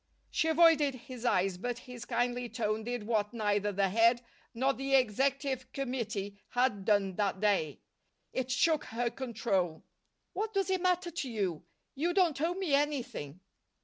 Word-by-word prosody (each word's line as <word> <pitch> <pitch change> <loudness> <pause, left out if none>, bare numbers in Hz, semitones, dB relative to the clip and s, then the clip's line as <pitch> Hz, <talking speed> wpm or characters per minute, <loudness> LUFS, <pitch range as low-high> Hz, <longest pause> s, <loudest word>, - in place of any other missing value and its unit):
She 320 - +1
avoided 320 -4 +5
his 250 0 -9
eyes, 185 -5 +2
but 245 +3 -3
his 250 -1 -9
kindly 245 0 -1
tone 215 -2 -1
did 240 -1 -3
what 215 -1 0
neither 205 -2 +1
the 195 0 +1
Head 230 +4 +4 0.3
nor 265 +4 +1
the 270 +1 0
Executive 265 +2 +1
Committee 220 -7 -3
had 245 -6 +1
done 200 -3 +2
that 200 -2 0
day. 200 -8 +1 0.5
It 260 -1 -2
shook 310 +5 +2
her 235 +1 -2
control. 200 -10 -1 0.5
"What 430 +2 -3
does 390 -1 +1
it 375 -1 +1
matter 360 -1 +1
to 310 -5 -4
you? 195 -8 -2 0.3
You 340 +6 -1
don't 340 -7 +3
owe 340 +3 +1
me 370 -6 -1
anything." 255 - -1
245 Hz, 155 wpm, -31 LUFS, 210-280 Hz, 0.5 s, avoided